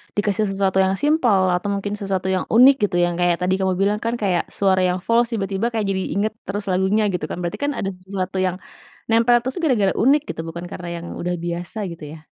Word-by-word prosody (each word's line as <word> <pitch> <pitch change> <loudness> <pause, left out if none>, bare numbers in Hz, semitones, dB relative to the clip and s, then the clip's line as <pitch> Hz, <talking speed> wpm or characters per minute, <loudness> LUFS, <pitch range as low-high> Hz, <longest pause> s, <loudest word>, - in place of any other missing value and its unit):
dikasih 205 0 +1
sesuatu 195 -1 0
yang 190 +1 +1
simpel 265 -10 +3 0.2
atau 190 +3 -3
mungkin 200 +1 -3
sesuatu 190 -2 -2
yang 185 - -2
unik 260 +3 +8
gitu, 195 - +1
yang 175 -1 -2
kayak 175 -1 +3
tadi 185 +1 +1
kamu 190 -1 +1
bilang 205 +2 +2
kan 230 - 0
kayak 180 -4 +1
suara 190 -2 +3
yang 180 +1 -1
fals 235 +1 +3
tiba-tiba 195 +2 -1
kayak 220 -2 -1
jadi 190 0 -1
inget 210 +2 +1 0.2
terus 200 +1 -3
lagunya 190 +4 +2
gitu 170 -3 -2
kan. - - -4
Berarti 170 - -4
kan 290 - +1
ada 195 - -1
sesuatu 185 0 -5
yang 180 0 -1 0.6
nempel 230 +1 +5
terus 260 +1 -3
tuh - - -6
gara-gara 210 -7 +2
unik 280 +3 +5
gitu, 160 - -6
bukan 170 +1 -6
karena 175 -1 -7 0.2
yang - - -7 0.2
udah 180 0 -1
biasa 175 +4 -5
gitu 165 -2 -10
ya. 155 - -15
195 Hz, 225 wpm, -21 LUFS, 180-215 Hz, 0.6 s, unik